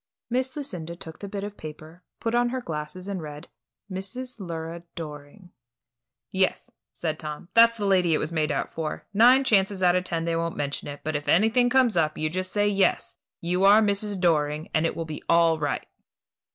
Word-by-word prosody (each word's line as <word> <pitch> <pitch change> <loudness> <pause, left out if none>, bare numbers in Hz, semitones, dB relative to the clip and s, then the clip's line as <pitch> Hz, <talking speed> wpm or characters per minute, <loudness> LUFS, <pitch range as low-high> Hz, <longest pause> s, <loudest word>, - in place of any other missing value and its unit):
Miss 255 +1 0
Lucinda 175 - -4
took 160 -2 -9
the 200 - -6
bit 200 0 -5
of 205 0 -6
paper, 155 +2 -10 0.2
put 230 0 -2
on 240 0 +3
her 260 +1 -2
glasses, 160 -2 -6
and 195 -3 -3
read, 150 -1 -9 0.4
"Mrs. 230 +6 -6
Lura 165 -2 -5
Doring." 155 +4 -9 0.8
"Yes," 190 0 0 0.2
said 155 -2 -3
Tom; 155 +3 -6
"that's 230 0 +6
the 205 - -2
lady 180 -4 +3
it - - +2
was 155 - -3
made 155 -2 0
out 140 - -2
for. 160 -2 -4
Nine 245 +6 +6
chances 195 -5 +2
out 175 0 +5
of 180 - +1
ten 165 -2 -2
they 165 0 0
won't 165 0 -2
mention 145 -1 -3
it; 145 0 -7
but 155 0 -2
if 145 0 -3
anything 225 +6 +4
comes 250 -4 +3
up, 155 -2 +1
you 155 0 -1
just 185 +1 -3
say 205 0 +2
yes, 200 -1 +1 0.2
you 180 +2 0
are 200 +2 +8
Mrs. 205 -1 +1
Doring, 155 -3 +1
and 155 +1 +2
it - - -4
will 165 - -3
be 155 -1 -7
all 165 -1 +4
right." 145 -1 -2
175 Hz, 200 wpm, -26 LUFS, 155-205 Hz, 0.8 s, are